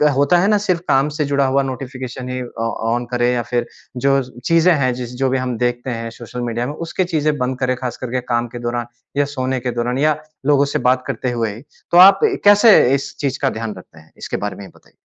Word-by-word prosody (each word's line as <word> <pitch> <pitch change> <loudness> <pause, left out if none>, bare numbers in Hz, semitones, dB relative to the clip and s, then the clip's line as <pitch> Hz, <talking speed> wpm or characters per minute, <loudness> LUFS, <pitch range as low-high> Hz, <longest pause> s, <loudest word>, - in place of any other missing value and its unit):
होता 145 +6 +3
है 195 - +2
ना 210 -1 +4
सिर्फ़ 185 -4 0
काम 135 +3 +3
से 150 - +2
जुड़ा 140 -1 +1
हुआ 135 +1 +2
नोटिफ़िकेशन 130 -1 -6
ही 130 0 -3 0.2
ऑ 115 - 0 0.2
ऑन 120 0 -2
करें। 120 0 +1
या 120 - 0
फिर 120 -1 0 0.3
जो 135 +1 +2 0.2
चीज़ें 165 +1 +4
हैं 130 -4 +1
जिस 125 -1 -6
जो 130 - +3
भी 135 - +1
हम 125 -2 -2
देखते 120 +1 -1
हैं 115 -1 -4
सोशल 120 +1 -7
मीडिया 120 +1 -2
में 145 - -4
उसके 170 +3 -2
चीज़ें 150 -1 +1
बंद 125 0 -2
करें 130 0 0
ख़ास 125 -2 -4
कर 125 -2 -6
के 130 -1 -1
काम 120 0 +1
के - - -4
दौरान। 120 0 -3 0.3
या 145 - +3
सोने 130 0 -1
के 125 0 -3
दौरान 120 +2 -2
या 150 +1 +2 0.3
लोगों 145 -1 +4
से - - +2
बात 130 0 +1
करते 125 - -2
हुए 115 -3 -2
ही। 115 - -11 0.3
तो 175 - +4
आप 190 +2 +9 0.3
कैसे 205 +1 +7 0.2
इस 135 - -5
चीज़ 135 -2 -2
का 135 - +2
ध्यान 110 -2 -5
रखते 85 -3 -14
हैं? 80 - -21
इसके - - -4
बारे 105 0 -4
में 100 - -9
ही - - -14
बताइए। - - -24
130 Hz, 245 wpm, -19 LUFS, 120-140 Hz, 0.3 s, आप